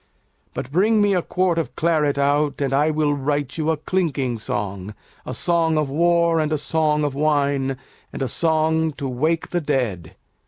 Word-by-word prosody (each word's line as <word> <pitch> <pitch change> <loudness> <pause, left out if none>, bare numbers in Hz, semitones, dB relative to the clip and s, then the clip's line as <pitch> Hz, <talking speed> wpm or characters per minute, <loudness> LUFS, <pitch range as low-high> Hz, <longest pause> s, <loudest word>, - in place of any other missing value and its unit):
But 125 - -5
bring 210 +7 +3
me 205 -1 +3
a 180 - +2
quart 180 -1 0
of 165 - -4
claret 150 -4 +1
out, 145 +1 +1
And 135 -2 -1
I 145 +3 +3
will 155 -1 +1
write 145 +1 -2
you 155 0 0
a 160 - +1
clinking 140 -8 -1
song, 105 -1 -4 0.3
A 125 - -4
song 165 +1 +1
of 150 -3 0
war 170 +1 +3
and 155 -1 0
a 155 - +1
song 150 +1 0
of 145 -2 -1
wine 140 -2 0 0.3
And - - -4
a - - -1
song 160 +2 +1
to 140 -1 -5
wake 155 +6 -1
the 175 - 0
dead. 120 - -2
150 Hz, 185 wpm, -22 LUFS, 135-165 Hz, 0.3 s, bring